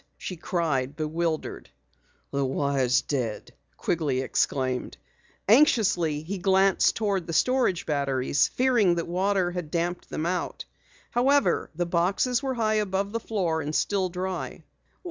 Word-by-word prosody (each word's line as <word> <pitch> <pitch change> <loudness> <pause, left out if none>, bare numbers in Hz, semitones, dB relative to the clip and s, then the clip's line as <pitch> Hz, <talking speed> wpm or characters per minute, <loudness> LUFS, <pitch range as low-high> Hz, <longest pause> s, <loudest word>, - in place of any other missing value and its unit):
she 185 - -6
cried, 150 -6 -1
bewildered. 160 +1 -3 0.6
"The 140 0 0
wire's 135 -2 +1
dead!" 125 -6 -3 0.3
Quigley 145 -6 0
exclaimed. 130 -1 -1 0.5
Anxiously 195 - +3
he 190 +4 -4
glanced 190 0 +3
toward 200 -5 -1
the 165 - -4
storage 250 -3 +2
batteries, 140 -2 +1
fearing 240 -9 +2
that 170 - -3
water 185 +1 +1
had 175 -3 -5
damped 175 +2 -2
them 155 - -3
out. 180 +1 -2 0.5
However, 275 +4 +2
the 175 +2 -1
boxes 185 +9 +1
were 265 -2 -2
high 215 -2 +1
above 200 0 -2
the 230 - -2
floor 180 -8 -1
and 150 +1 -4
still 195 -2 +1
dry. 185 +1 -4
175 Hz, 130 wpm, -26 LUFS, 150-200 Hz, 0.6 s, Anxiously